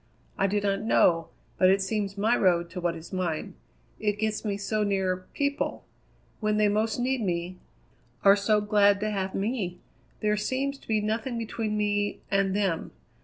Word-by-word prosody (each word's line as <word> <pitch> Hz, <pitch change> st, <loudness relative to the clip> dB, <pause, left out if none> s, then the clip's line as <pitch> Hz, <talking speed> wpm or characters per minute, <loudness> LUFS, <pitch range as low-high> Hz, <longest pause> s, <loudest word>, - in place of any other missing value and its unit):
"I 195 Hz, -, +2 dB
do 205 Hz, +2 st, +1 dB
not 200 Hz, 0 st, 0 dB
know, 170 Hz, -6 st, +3 dB, 0.3 s
but 185 Hz, -, +6 dB
it 195 Hz, +1 st, +4 dB
seems 200 Hz, 0 st, -2 dB
my 220 Hz, +4 st, +3 dB
road 170 Hz, -4 st, +2 dB
to 180 Hz, 0 st, -5 dB
what 175 Hz, -1 st, 0 dB
is 165 Hz, +3 st, -10 dB
mine. 175 Hz, -4 st, -2 dB, 0.5 s
It 210 Hz, -1 st, 0 dB
gets 215 Hz, 0 st, -1 dB
me 205 Hz, -2 st, -1 dB
so 215 Hz, +1 st, -1 dB
near 190 Hz, -2 st, 0 dB
people 285 Hz, 0 st, -1 dB, 0.5 s
when 215 Hz, -1 st, +1 dB
they 210 Hz, 0 st, +4 dB
most 215 Hz, +2 st, 0 dB
need 255 Hz, +1 st, 0 dB
me 180 Hz, -2 st, -2 dB, 0.6 s
are 195 Hz, 0 st, +8 dB
so 210 Hz, +1 st, +2 dB
glad 205 Hz, -1 st, +4 dB
to 215 Hz, 0 st, 0 dB
have 195 Hz, -2 st, -2 dB
me! 195 Hz, -4 st, -2 dB, 0.4 s
There 210 Hz, 0 st, +2 dB
seems 270 Hz, +6 st, -2 dB
to -, -, -20 dB
be 215 Hz, -1 st, +1 dB
nothing 225 Hz, +3 st, -2 dB
between 220 Hz, -1 st, -2 dB
me 205 Hz, -1 st, 0 dB
and 195 Hz, -1 st, +2 dB
them. 195 Hz, -5 st, -1 dB
205 Hz, 175 wpm, -27 LUFS, 190-215 Hz, 0.6 s, are